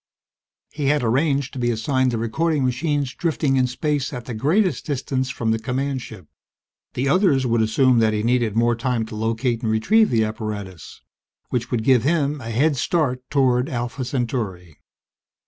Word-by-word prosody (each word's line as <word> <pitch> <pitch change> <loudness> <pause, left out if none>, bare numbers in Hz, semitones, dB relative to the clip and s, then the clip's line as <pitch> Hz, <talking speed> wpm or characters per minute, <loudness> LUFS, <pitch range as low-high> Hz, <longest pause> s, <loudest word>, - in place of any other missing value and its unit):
He 150 -2 -4
had 145 -1 +2
arranged 135 +3 +1
to 135 - -6
be 120 -1 +1
assigned 130 +3 +1
the 120 - -2
recording 140 +6 0
machines 140 +1 -1
drifting 150 -3 0
in 130 -1 +3
space 145 +3 -2
at 125 -4 -7
the 125 - -5
greatest 170 - +1
distance 130 -2 -2
from 115 -3 -1
the 110 - 0
command 130 +3 -2
ship. 110 -8 -11 0.7
The 130 +3 -1
others 145 -4 +3
would 115 -2 +2
assume 120 +3 +3
that 110 -1 +3
he 105 0 -1
needed 120 -3 +1
more 120 +1 +2
time 115 -1 -1
to 110 - -9
locate 115 +2 -1
and 110 -3 -1
retrieve 210 - +3
the 115 -2 +2
apparatus 105 -5 -6 0.5
which 120 -1 -2
would 120 -3 -1
give 130 -1 +4
him 145 0 0
a 115 - -6
head 140 +6 +1
start 130 -3 0
toward 130 -2 +2
Alpha 125 +1 -3
Centauri. 115 - -4
125 Hz, 175 wpm, -22 LUFS, 115-140 Hz, 0.7 s, give